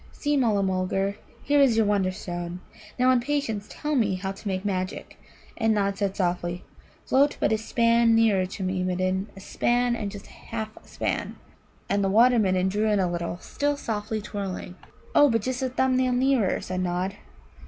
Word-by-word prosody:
"See, 295 0 -1
Mulla 220 -7 +2
mulgar, 190 +1 -1 0.3
here 285 0 +3
is 250 -5 +4
your 225 - +4
Wonderstone. 185 -3 -2 0.4
Now 255 0 +4
in 255 - +4
patience 235 -6 -2
tell 300 0 -3
me 215 -8 +2
how 190 +1 -3
to 195 +2 -9
make 190 0 -2
magic." 185 -1 -3 0.4
And 220 -1 +2
Nod 200 -1 +1
said 195 -1 -2
softly: 175 -1 -1 0.4
"Float 280 +2 +3
but - - +2
a 220 - +3
span 230 +1 +3
nearer 210 -5 +3
to 190 +1 -6
me, 185 0 -1
Midden 185 +2 -1
a - - -10
span 240 +4 +1
and 210 -3 -3
just 200 0 -9
a - - -16
half 220 -1 -6
a - - -22
span." - - -3 0.5
And 200 0 +1
the 195 - +1
Water 235 +4 +5
midden 185 -2 +2
drew 210 +3 0
in 210 -2 +2
a 185 - +2
little, 170 0 -3
still 290 0 -1
softly 215 -3 -3
twirling. 195 -3 -5 0.4
"Oh, 290 - +6
but 230 -3 +1
just 255 +1 -2
a 260 - 0
thumb 260 0 +1
nail 255 -1 +2
nearer," 250 -5 +2
said 185 0 -3
Nod. 180 +2 -2
205 Hz, 190 wpm, -26 LUFS, 185-240 Hz, 0.5 s, Oh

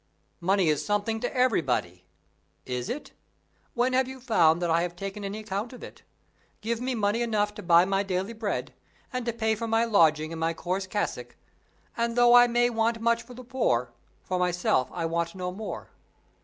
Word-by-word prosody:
"Money 190 0 +2
is 150 -2 +1
something 205 +2 -1
to 245 - -2
everybody." 135 - 0 0.6
"Is 125 -1 -4
it? 295 - -5 0.6
When 250 +1 +1
have 260 0 +2
you 265 0 -8
found 175 -10 +3
that 175 -2 0
I 165 +1 +3
have 175 0 -3
taken 195 +3 -6
any 200 +1 -4
account 215 +3 -4
of 250 - -11
it? - - -11 0.6
Give 230 +2 -2
me 255 0 -1
money 215 +1 +1
enough 210 -3 0
to - - -8
buy 170 0 +5
my 195 0 +1
daily 195 +2 -2
bread, 220 -2 -3 0.4
and 250 -1 -3
to - - +2
pay 220 -1 0
for 230 +2 -3
my 225 +1 +2
lodging 160 -7 +3
and 165 - -6
my 165 0 0
coarse 185 +3 -3
cassock, 205 +2 -3 0.6
and 235 0 -1
though 240 0 +6
I 245 0 +8
may 240 0 +2
want 225 0 0
much 235 +1 +2
for 245 +1 -13
the 255 - -9
poor, 125 - 0 0.3
for 185 -1 -2
myself 180 -7 +1
I 170 -2 -3
want 170 +1 -2
no 180 -1 -3
more. 210 +4 -7
205 Hz, 195 wpm, -27 LUFS, 175-235 Hz, 0.6 s, I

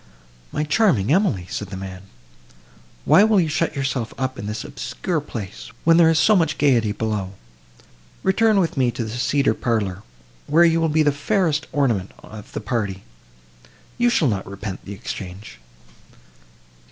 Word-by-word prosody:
"My 150 - -1
charming 150 - +2
Emily," 175 - +1
said 105 - -4
the 95 0 -7
man, 95 -1 -7 1.0
"why 200 - +6
will 215 -2 +4
you 170 - +2
shut 165 +2 -1
yourself 135 -4 -2
up 130 0 -3
in 100 - -5
this 105 +1 -4
obscure 155 +8 -3
place, 110 -5 -8
when 165 0 +5
there 165 -2 +6
is 165 - +3
so 215 +6 +5
much 160 -4 +1
gaiety 120 -7 +3
below? 105 -3 -3 0.9
Return 215 +2 +3
with 170 -5 -1
me 130 -2 +3
to 120 - -3
the 110 - -5
cedar 135 +4 +1
parlour, 100 -6 -2 0.5
where 165 +4 +5
you 165 0 +3
will 165 - +2
be 155 +1 +3
the 145 - +3
fairest 160 0 0
ornament 115 -10 0
of 105 -1 -11
the - - -4
party;—you - - -5
shall 175 -10 +2
not 100 -5 -2
repent 100 -1 -6
the 100 - -7
exchange." 95 - -8
125 Hz, 160 wpm, -22 LUFS, 100-160 Hz, 1.0 s, why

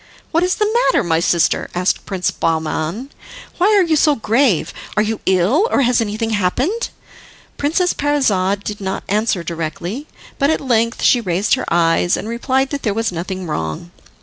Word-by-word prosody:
"What 330 - +2
is 365 0 +1
the 425 - +1 0.2
matter, - - +3
my 165 -2 +1
sister?" 170 -1 +1
asked 180 +1 0
Prince 185 -2 -1
Bahman; 165 - -2 0.5
"why 365 - +4
are 390 - +5
you 330 -2 +1
so 300 0 +4
grave? 225 - +1 0.2
Are 210 - +4
you 220 0 -2
ill? 190 - +3
Or - - +2
has 245 -1 +2
anything 225 +1 -2
happened?" 255 - 0 0.7
Princess 335 +5 +1
Parizade 205 -10 +1
did 210 0 -5
not 190 0 -3
answer 210 -3 0
directly, 170 - -5 0.3
but 280 0 +3
at 315 - +1
length 230 -3 0
she 245 - +4
raised 190 0 0
her 260 - -1
eyes, 170 +1 +2
and - - -5
replied 260 +3 0
that 285 -1 -3
there 210 -3 -1
was 225 -2 0
nothing 185 +2 -5
wrong. 150 - -4
215 Hz, 175 wpm, -18 LUFS, 180-270 Hz, 0.7 s, are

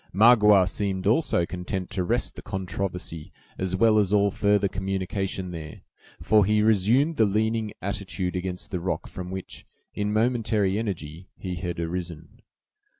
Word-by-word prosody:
Magua 105 -3 +6
seemed 95 -1 -2
also 110 - +2
content 90 +2 -5
to 95 -2 -1
rest 120 +7 -1
the - - -8
controversy 90 -4 -5 0.3
as 95 -1 -1
well 110 +2 +4
as 100 -2 +1
all 100 -1 +3
further 105 0 +2
communication 95 -1 -3
there, 80 -3 -8 0.4
for 105 -1 +4
he 105 +2 +2
resumed 110 - +3
the 110 - +5
leaning 110 +1 0
attitude 95 -2 -3
against 90 0 -4
the 90 - -2
rock 90 +2 -2
from 90 -1 -7
which, 95 0 -7 0.3
in 105 0 -2
momentary 110 -3 +1
energy, 90 -5 -5
he 90 -2 -5
had 85 0 -4
arisen. 85 -1 -5
95 Hz, 150 wpm, -25 LUFS, 90-105 Hz, 0.4 s, Magua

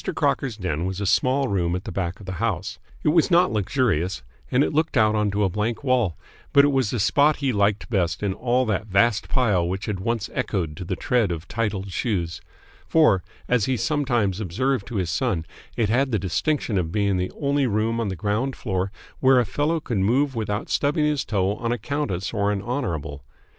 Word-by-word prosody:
Crocker's 125 -6 0
den 90 -4 -2
was 95 0 -3
a 100 - -2
small 130 +7 +2
room 90 -5 0
at 90 - -4
the 110 - -6
back 90 -1 -3
of 105 - -11
the 95 - -5
house. 100 -6 -2 0.2
It - - +3
was 165 +1 +3
not 175 -5 +4
luxurious, 100 - 0 0.3
and 130 +2 +3
it - - -1
looked 155 -1 +1
out 110 -1 +4
onto 105 -1 +1
a - - +3
blank 105 +6 -2
wall, 120 - +1 0.4
but 140 0 +7
it - - +3
was 130 -5 +1
the 120 - -2
spot 145 +9 +4
he 135 -3 -1
liked 100 0 +1
best 90 -4 -1
in 100 -2 0
all 125 +4 +1
that 110 -1 -1
vast 105 +3 +2
pile 100 -10 +2
which 95 +2 -3
had 100 -3 -3
once 115 +2 -1
echoed 85 -7 -2
to - - -5
the 90 +1 -3
tread 115 +1 +1
of 85 -1 -5
titled 100 -4 -2
shoes; 85 -5 -2 0.5
for, 150 - +4 0.3
as 125 -4 +2
he 130 -1 0
sometimes 120 - 0
observed 110 +4 -1
to 120 - -7
his 90 -4 -1
son, 95 -7 0 0.3
it 110 -3 +1
had 130 +4 +2
the 110 - +1
distinction 100 - 0
of 80 -2 -2
being 100 0 +1
the 90 0 -2
only 140 -2 +1
room 110 +1 0
on 115 - -1
the 95 - -3
ground 105 +9 -1
floor 95 -3 -2 0.3
where 130 -1 +5
a 120 - +2
fellow 150 +10 0
could 120 -8 -2
move 130 +8 +2
without 105 -2 -2
stubbing 150 +2 +1
his 150 -2 +1
toe 100 -2 0
on 115 +1 -2
a 120 - 0
countess 115 -7 -3
or 100 -2 +1
an 100 -2 -2
honourable. 80 - -3
105 Hz, 210 wpm, -24 LUFS, 95-130 Hz, 0.5 s, but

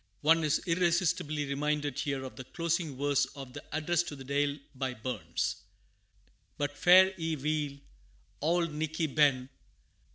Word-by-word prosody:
One 160 +2 +4
is 150 -1 +1
irresistibly 170 -4 +1
reminded 145 0 -1
here 140 -2 -2
of 130 - -8
the 130 - -7
closing 165 -1 -2
verse 145 0 +2
of 135 -3 -9
the 145 - -8
Address 160 +2 +1
to 145 - -6
the 135 - -9
Deil, 140 +1 0 0.2
by 130 -1 -3
Burns: 115 -2 -3 1.0
"But 145 0 -2
fare 185 +4 +7
ye 160 -1 -1
weel, 150 -1 -2 0.6
Auld 165 +1 +1
Nickie 160 0 -2
ben! 135 -4 +3
150 Hz, 140 wpm, -30 LUFS, 140-160 Hz, 1.0 s, fare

